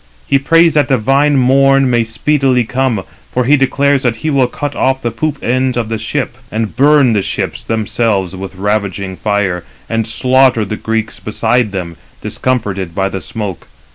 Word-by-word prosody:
He 140 Hz, -, +2 dB
prays 165 Hz, +4 st, +4 dB
that 145 Hz, -3 st, +2 dB
divine 135 Hz, +3 st, +2 dB
morn 135 Hz, +1 st, +4 dB
may 120 Hz, -2 st, +2 dB
speedily 130 Hz, +2 st, +1 dB
come. 125 Hz, -3 st, -1 dB, 0.3 s
For 125 Hz, -, 0 dB
he 145 Hz, +4 st, +5 dB
declares 140 Hz, 0 st, +2 dB
that 125 Hz, -3 st, 0 dB
he 155 Hz, +7 st, -3 dB
will 135 Hz, -3 st, +3 dB
cut 145 Hz, +3 st, -5 dB
off 130 Hz, 0 st, 0 dB
the 120 Hz, -, -1 dB
poop 150 Hz, +6 st, -2 dB
ends 130 Hz, +1 st, 0 dB
302 -, -, 0 dB
of 115 Hz, -2 st, -3 dB
the 115 Hz, -, -2 dB
ships, 120 Hz, +2 st, -3 dB
and 110 Hz, 0 st, -3 dB
burn 140 Hz, -2 st, +4 dB
[the 105 Hz, -, +2 dB
ships] -, -, -4 dB
themselves 110 Hz, -4 st, -1 dB
with 95 Hz, 0 st, -7 dB
ravaging 100 Hz, -1 st, -2 dB
fire, 100 Hz, -4 st, -1 dB, 0.2 s
and 115 Hz, -1 st, -1 dB
slaughter 130 Hz, 0 st, +3 dB
the 105 Hz, -, -4 dB
Greeks 110 Hz, 0 st, -3 dB
beside 110 Hz, +1 st, 0 dB
them, 90 Hz, -4 st, -5 dB, 0.2 s
discomforted 100 Hz, -9 st, -2 dB
by 95 Hz, 0 st, 0 dB
the 95 Hz, -, -5 dB
smoke. 105 Hz, -6 st, -6 dB
120 Hz, 175 wpm, -14 LUFS, 105-135 Hz, 0.3 s, he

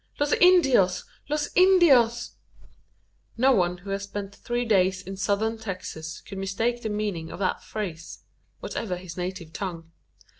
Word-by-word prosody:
"Los 290 Hz, 0 st, +2 dB
Indios! 270 Hz, -, +5 dB, 0.3 s
Los 300 Hz, 0 st, -1 dB
Indios!" 285 Hz, -11 st, +5 dB, 1.1 s
No 260 Hz, +3 st, +4 dB
one 180 Hz, -6 st, +2 dB
who 195 Hz, +3 st, -8 dB
has 195 Hz, 0 st, -2 dB
spent 200 Hz, 0 st, -6 dB
three 240 Hz, 0 st, -2 dB
days 190 Hz, -3 st, +2 dB
in 195 Hz, 0 st, -7 dB
Southern 215 Hz, +3 st, 0 dB
Texas 175 Hz, -6 st, -6 dB
could 195 Hz, -, -8 dB
mistake 225 Hz, +5 st, -1 dB
the 220 Hz, -, -3 dB
meaning 205 Hz, -6 st, -3 dB
of -, -, -7 dB
that 190 Hz, -1 st, -1 dB
phrase 175 Hz, -7 st, -6 dB, 0.4 s
whatever 185 Hz, -5 st, -3 dB
his 180 Hz, -2 st, -9 dB
native 180 Hz, -2 st, -5 dB
tongue. 165 Hz, -4 st, -6 dB
200 Hz, 145 wpm, -26 LUFS, 185-240 Hz, 1.1 s, Indios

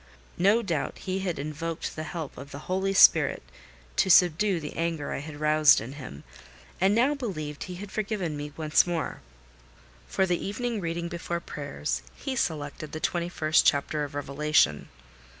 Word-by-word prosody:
No 205 Hz, +6 st, +4 dB
doubt 170 Hz, -7 st, -2 dB
he 190 Hz, 0 st, -3 dB
had 185 Hz, -3 st, -2 dB
invoked 155 Hz, +3 st, -4 dB
the 155 Hz, -, -4 dB
help 160 Hz, -2 st, -6 dB
of 140 Hz, +2 st, -9 dB
the 140 Hz, -, -8 dB
Holy 190 Hz, +1 st, 0 dB
Spirit 195 Hz, -, +5 dB, 0.5 s
to 190 Hz, -, +3 dB
subdue 180 Hz, +2 st, +5 dB
the 150 Hz, -2 st, -7 dB
anger 165 Hz, -3 st, -2 dB
I -, -, -3 dB
had 145 Hz, +1 st, -8 dB
roused 150 Hz, -1 st, +5 dB
in 115 Hz, +5 st, -7 dB
him, 125 Hz, -, -9 dB, 0.6 s
and 195 Hz, +3 st, +3 dB
now 255 Hz, +6 st, +3 dB
believed 155 Hz, -, -5 dB
he 180 Hz, -, -7 dB
had 195 Hz, +2 st, -8 dB
forgiven 200 Hz, -7 st, -2 dB
me 145 Hz, 0 st, -5 dB
once 155 Hz, +2 st, +3 dB
more. 170 Hz, -2 st, -3 dB, 0.9 s
For 190 Hz, -, +1 dB
the 180 Hz, -2 st, -1 dB
evening 230 Hz, +2 st, -2 dB
reading 170 Hz, 0 st, -3 dB
before 170 Hz, 0 st, -3 dB
prayers, 145 Hz, -2 st, -4 dB
he 270 Hz, -2 st, -4 dB
selected 155 Hz, -, -3 dB
the 155 Hz, -, -4 dB
twenty 170 Hz, +1 st, -1 dB
first 155 Hz, -2 st, +3 dB
chapter 150 Hz, +1 st, +1 dB
of 145 Hz, 0 st, -6 dB
Revelation. 145 Hz, -, +1 dB
165 Hz, 170 wpm, -27 LUFS, 150-190 Hz, 0.9 s, Spirit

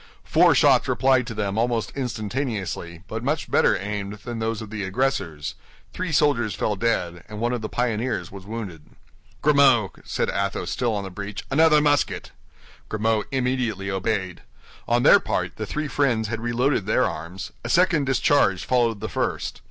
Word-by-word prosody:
Four -, -, +4 dB
shots -, -, +4 dB
replied 130 Hz, -2 st, +2 dB
to 115 Hz, -, -5 dB
them 100 Hz, 0 st, -1 dB
almost 115 Hz, -3 st, 0 dB
instantaneously, 110 Hz, -, -3 dB
but 110 Hz, +1 st, -5 dB
much 145 Hz, +4 st, -2 dB
better -, -, +4 dB
aimed 100 Hz, 0 st, -4 dB
than 120 Hz, -2 st, -4 dB
those 110 Hz, -1 st, -1 dB
of 110 Hz, -2 st, -8 dB
the 105 Hz, -2 st, -4 dB
aggressors; 95 Hz, -, -1 dB, 0.4 s
three 185 Hz, -2 st, -3 dB
soldiers 140 Hz, -8 st, +2 dB
fell 105 Hz, -, -1 dB
dead, 90 Hz, -5 st, -1 dB
and 105 Hz, 0 st, -7 dB
one 120 Hz, +2 st, 0 dB
of 120 Hz, -, -2 dB
the 110 Hz, -, -4 dB
pioneers 115 Hz, -6 st, -1 dB
was 100 Hz, -1 st, -9 dB
wounded. 95 Hz, -8 st, -7 dB, 0.6 s
"Grimaud," 135 Hz, -, +4 dB
said -, -, -1 dB
Athos, 100 Hz, 0 st, -2 dB
still 120 Hz, -3 st, 0 dB
on 100 Hz, -, -2 dB
the 95 Hz, -, -7 dB
breach, 100 Hz, +2 st, -6 dB
"another 155 Hz, +1 st, +5 dB
musket!" 145 Hz, -1 st, +1 dB, 0.6 s
Grimaud 110 Hz, 0 st, 0 dB
immediately 125 Hz, -7 st, -1 dB
obeyed. 95 Hz, -2 st, -2 dB, 0.5 s
On 120 Hz, +1 st, +2 dB
their -, -, +8 dB
part, -, -, -2 dB
the -, -, -4 dB
three 150 Hz, 0 st, -3 dB
friends 120 Hz, -7 st, +1 dB
had 115 Hz, -1 st, -3 dB
reloaded 120 Hz, -2 st, 0 dB
their 125 Hz, +4 st, +3 dB
arms; 85 Hz, +4 st, -5 dB
a 120 Hz, -, -5 dB
second 170 Hz, -2 st, +3 dB
discharge 130 Hz, -7 st, +2 dB
followed 120 Hz, -4 st, +1 dB
the -, -, -3 dB
first. -, -, -3 dB
115 Hz, 170 wpm, -24 LUFS, 100-130 Hz, 0.6 s, their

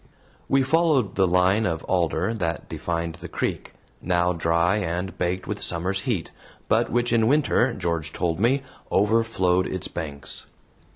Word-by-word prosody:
We 135 Hz, 0 st, +4 dB
followed 140 Hz, -, +2 dB
the 95 Hz, -1 st, +3 dB
line 90 Hz, +4 st, +3 dB
of 80 Hz, -2 st, -2 dB
alder 90 Hz, +3 st, 0 dB
that 85 Hz, -9 st, -3 dB
defined 85 Hz, -1 st, -3 dB
the -, -, -6 dB
creek, -, -, -3 dB, 0.3 s
now 90 Hz, 0 st, +1 dB
dry 85 Hz, +3 st, +2 dB
and 90 Hz, -1 st, -2 dB
baked 90 Hz, +1 st, -2 dB
with 105 Hz, 0 st, -4 dB
summer's 90 Hz, +3 st, -2 dB
heat, 95 Hz, -9 st, -1 dB, 0.4 s
but -, -, +2 dB
which 120 Hz, 0 st, +1 dB
in 115 Hz, -1 st, +3 dB
winter, 135 Hz, -2 st, +3 dB
George 85 Hz, -4 st, -2 dB
told 85 Hz, 0 st, -1 dB
me, 130 Hz, +6 st, +2 dB, 0.3 s
overflowed 100 Hz, -4 st, +2 dB
its 95 Hz, 0 st, -3 dB
banks. 75 Hz, -4 st, -5 dB
95 Hz, 150 wpm, -24 LUFS, 85-110 Hz, 0.4 s, We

